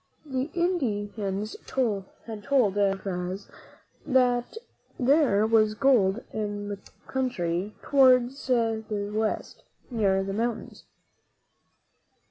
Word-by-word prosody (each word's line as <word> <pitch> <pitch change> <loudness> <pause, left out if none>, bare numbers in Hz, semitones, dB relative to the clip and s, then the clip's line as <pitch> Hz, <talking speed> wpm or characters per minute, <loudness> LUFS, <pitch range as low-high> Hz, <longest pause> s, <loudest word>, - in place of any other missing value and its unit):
The 265 0 -2
Indians 265 - 0 0.4
had - - -28
told 215 -7 0 0.7
Narvaez 195 -1 -1 0.6
that 250 - +1 0.4
there 255 -6 +4
was 215 -1 +3
gold 225 -4 +3
in 205 -1 -3
the 200 -1 -5 0.3
country 205 -7 -2
towards 260 -1 +4
the 220 -4 0
West, 215 0 -2 0.3
near 195 -5 +2
the 195 0 -4
moun 230 +2 -2
tains. - - -17
220 Hz, 95 wpm, -27 LUFS, 205-255 Hz, 0.7 s, there